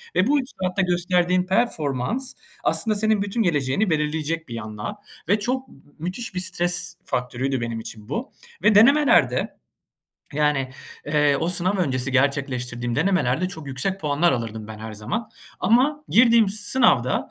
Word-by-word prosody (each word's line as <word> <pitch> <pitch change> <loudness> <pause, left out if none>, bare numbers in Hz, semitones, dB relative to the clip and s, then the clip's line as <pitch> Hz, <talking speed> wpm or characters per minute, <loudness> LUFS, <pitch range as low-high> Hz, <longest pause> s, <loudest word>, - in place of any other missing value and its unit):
ve - - +3
bu 290 +1 +3
3 265 0 -5
saatte 185 +1 0
gösterdiğin 180 0 +1
performans, 185 - -1 0.3
aslında 220 -2 +1
senin 215 0 +2
bütün 205 +3 -1
geleceğini 150 +3 +1
belirleyecek 155 0 -1
bir - - -6
yandan 110 - -6 0.3
ve 205 +2 +4
çok 255 +5 -2
m - - -17 0.3
müthiş 185 +4 -5
bir - - 0
stres 175 -1 -1
faktörüydü 125 +1 -2
benim 115 -1 -3
için 110 -1 -10
bu. 245 +4 -4 0.3
Ve 210 - +5
denemelerde, 280 +8 +4 0.8
yani, 145 -3 +1 0.4
eee, 150 -1 +3
o 165 +3 -1
sınav 185 +2 0
öncesi 135 -7 -1
gerçekleştirdiğim 125 -3 0
denemelerde 180 -1 +1
çok 160 -5 -9
yüksek 140 +9 -3
puanlar 150 +2 +2
alırdım 110 -3 -4
ben 110 -1 -8
her 110 0 -7
zaman 120 - -4 0.3
ama 270 +9 +2
girdiğim 230 -2 +5
sınavda 205 - +2
170 Hz, 145 wpm, -23 LUFS, 130-205 Hz, 0.8 s, Ve